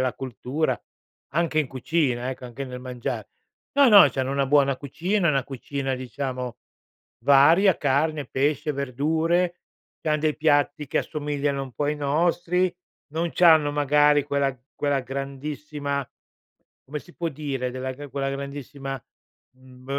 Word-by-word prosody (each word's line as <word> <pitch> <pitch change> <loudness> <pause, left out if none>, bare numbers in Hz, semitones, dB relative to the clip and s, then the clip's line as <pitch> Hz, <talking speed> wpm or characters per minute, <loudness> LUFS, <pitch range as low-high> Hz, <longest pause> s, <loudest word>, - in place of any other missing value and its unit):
la 130 -1 0
cultura, 130 +4 -2 0.5
anche 165 -1 +1
in 140 - -2
cucina, 130 -2 0
ecco, 130 - -8
anche 135 +3 -6
nel 125 -1 -7
mangiar. 125 -1 -4 0.5
No, 280 -2 +6
no, 205 -4 +9
c'hanno 135 0 -2
una 140 -1 +1
buona 140 -1 +3
cucina, 170 +7 -1
una 135 -3 +2
cucina 135 0 -3
diciamo 125 -1 -4 0.7
varia: 160 +8 +6
carne, 145 +1 0
pesce, 150 +3 0
verdure, 160 +6 0 0.4
c'han 155 -1 +1
dei 155 -1 +1
piatti 145 -1 +2
che - - 0
assomigliano 145 -2 -2
un 130 -2 -8
po' 145 - -2
ai 150 +1 0
nostri. 170 +5 +1 0.4
Non 165 +1 -1
c'hanno 160 -4 +5
magari 145 0 +4
quella 140 -2 0 0.2
quella 145 -2 0
grandissima 140 +1 -4 0.8
come 150 +2 -5
si 175 - -18
può 170 -1 -2
dire, 135 -4 -3
della 130 +1 -4
che 145 +2 -9
quella 135 0 -2
grandissima, 140 -1 -6 0.5
mhmm, 130 0 -17
140 Hz, 140 wpm, -25 LUFS, 135-155 Hz, 0.8 s, no